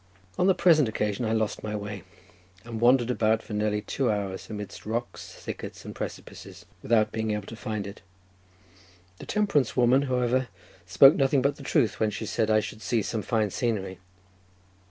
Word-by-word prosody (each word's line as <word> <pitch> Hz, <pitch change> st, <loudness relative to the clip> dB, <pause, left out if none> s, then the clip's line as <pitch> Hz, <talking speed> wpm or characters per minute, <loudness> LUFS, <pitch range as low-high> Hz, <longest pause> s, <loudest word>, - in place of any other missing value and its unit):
On 180 Hz, -, +2 dB
the 190 Hz, -, +4 dB
present 160 Hz, -8 st, +4 dB
occasion 105 Hz, +1 st, -2 dB
I 110 Hz, -, -1 dB
lost 110 Hz, -1 st, -1 dB
my 105 Hz, 0 st, -3 dB
way, 105 Hz, -1 st, -5 dB, 0.6 s
and 115 Hz, -1 st, -6 dB
wandered 125 Hz, 0 st, +4 dB
about 110 Hz, -2 st, +1 dB
for -, -, -8 dB
nearly 105 Hz, 0 st, 0 dB
two 135 Hz, +1 st, -1 dB
hours 100 Hz, -3 st, -3 dB
amidst 105 Hz, -2 st, -7 dB
rocks, 120 Hz, +3 st, -4 dB
thickets, -, -, -8 dB
and -, -, -7 dB
precipices, -, -, -8 dB, 0.2 s
without 110 Hz, -1 st, +2 dB
being 110 Hz, 0 st, -2 dB
able 105 Hz, -1 st, -2 dB
to 115 Hz, -, -9 dB
find 110 Hz, -2 st, -4 dB
it. 100 Hz, +1 st, -9 dB, 1.2 s
The -, -, -10 dB
temperance 200 Hz, -, +1 dB
woman, 125 Hz, +2 st, +5 dB
however, 125 Hz, 0 st, +1 dB, 0.4 s
spoke 115 Hz, +10 st, +7 dB
nothing 135 Hz, -1 st, +2 dB
but 140 Hz, +1 st, +1 dB
the -, -, -12 dB
truth, 140 Hz, -5 st, +1 dB
when 110 Hz, -, +2 dB
she 105 Hz, +2 st, -5 dB
said 110 Hz, +1 st, 0 dB
I 110 Hz, 0 st, +4 dB
should 110 Hz, +1 st, -8 dB
see 110 Hz, 0 st, 0 dB
some 110 Hz, +2 st, -2 dB
fine 110 Hz, -2 st, 0 dB
scenery. 95 Hz, -6 st, -2 dB
110 Hz, 175 wpm, -27 LUFS, 105-125 Hz, 1.2 s, spoke